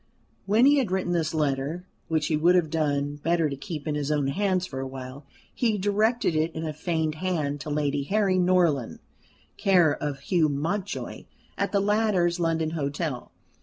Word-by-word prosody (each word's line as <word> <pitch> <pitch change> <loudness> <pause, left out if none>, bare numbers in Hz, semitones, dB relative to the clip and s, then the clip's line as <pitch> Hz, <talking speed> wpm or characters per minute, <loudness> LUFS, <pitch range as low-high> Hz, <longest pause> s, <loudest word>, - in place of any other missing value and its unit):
When 220 +5 +4
he 285 +1 +6
had 250 -7 0
written 185 -1 -1
this 165 -3 0
letter, 150 +3 -1 0.2
which 160 -2 0
he 160 - +1
would 170 +4 +4
have 170 -4 +2
done 145 -2 0
better 165 0 +1
to - - -3
keep 150 +1 -7
in 150 - 0
his 150 0 -2
own 145 -2 +1
hands 185 +3 0
for 130 -6 -6
awhile, 130 +1 -7 0.3
he 225 -4 +1
directed 210 +1 +1
it 155 +2 +1
in 160 0 -3
a 155 - -3
feigned 160 0 -1
hand 150 -6 -1
to 150 - -6
Lady 145 -1 0
Harry 195 0 +2
Norland, 175 -9 +2 0.6
care 185 -6 +4
of 140 -2 -4
Hugh 160 0 +2
Mountjoy, 175 +8 -3 0.3
at - - -1
the 200 - +2
latter's 200 -4 +1
London 165 -2 0
hotel. 145 -3 -3
160 Hz, 175 wpm, -26 LUFS, 145-185 Hz, 0.6 s, he